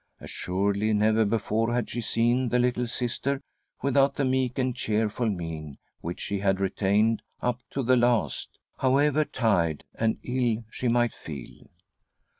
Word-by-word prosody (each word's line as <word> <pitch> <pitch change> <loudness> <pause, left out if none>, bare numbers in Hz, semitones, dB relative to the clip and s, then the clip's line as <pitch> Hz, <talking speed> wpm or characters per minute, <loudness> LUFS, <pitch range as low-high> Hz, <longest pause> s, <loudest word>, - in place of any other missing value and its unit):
Assuredly 100 +3 -1
never 110 +1 +3
before 115 +1 0
had 125 - 0
she 120 - -2
seen 120 +3 +1
the 125 - +2
littje 125 -1 +1
Sister 130 +3 -1 0.4
without 140 0 +3
the 140 - 0
meek 130 -1 0
and 130 -2 0
cheerful 110 +2 0
mien 80 -6 -5 0.2
which 85 +1 -5
she 100 - -2
had 95 -1 +1
retained 100 +3 +2 0.2
up 125 -1 -1
to 135 - -2
the 130 +2 +4
last, 120 -2 +1 0.2
however 145 +3 +3
tired 90 - +1
and 110 0 0
ill 120 -3 0
she 125 - -3
might 120 0 +2
feel. 70 -6 -10
115 Hz, 145 wpm, -27 LUFS, 100-125 Hz, 0.4 s, the